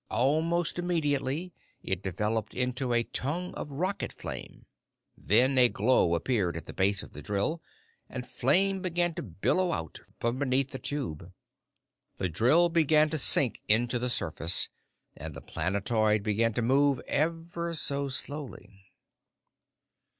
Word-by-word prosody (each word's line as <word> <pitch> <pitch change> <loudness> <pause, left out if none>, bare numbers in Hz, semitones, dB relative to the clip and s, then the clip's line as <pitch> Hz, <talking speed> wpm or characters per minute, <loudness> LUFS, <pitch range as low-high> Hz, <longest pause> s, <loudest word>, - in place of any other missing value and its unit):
Almost 165 +7 +1
immediately, 160 -1 -1 0.3
it 95 -1 -1
developed 105 +4 -2
into 125 0 -1
a 120 0 +2
tongue 165 +10 -3
of 145 - -6
rocket 185 +8 -2
flame. - - -9 0.5
Then 130 +6 +3
a 125 -1 +7
glow 105 -7 +2
appeared 90 -3 0
at 80 - -8
the - - -9
base 95 +1 +1
of - - -13
the - - -9
drill 105 +12 -1 0.5
and - - -6
flame 195 0 +1
began 175 -2 +1
to - - -5
billow 145 - 0
out 80 - -4 0.2
from 120 +2 -1
beneath 135 -1 +1
the 130 - -6
tube. 95 - -5 0.9
The 95 - -1
drill 130 - +3
began 155 -2 +3
to 155 - +1
sink 130 -2 +5
into 120 +3 +2
the 125 +1 -2
surface, 85 -6 0 0.5
and 80 -3 -8
the - - -7
planetoid 105 - 0
began 110 +2 +1
to 120 - 0
move 135 +2 +3
ever 170 +2 -2
so 140 -2 0
slowly. 125 -9 -5
130 Hz, 140 wpm, -29 LUFS, 105-160 Hz, 0.9 s, a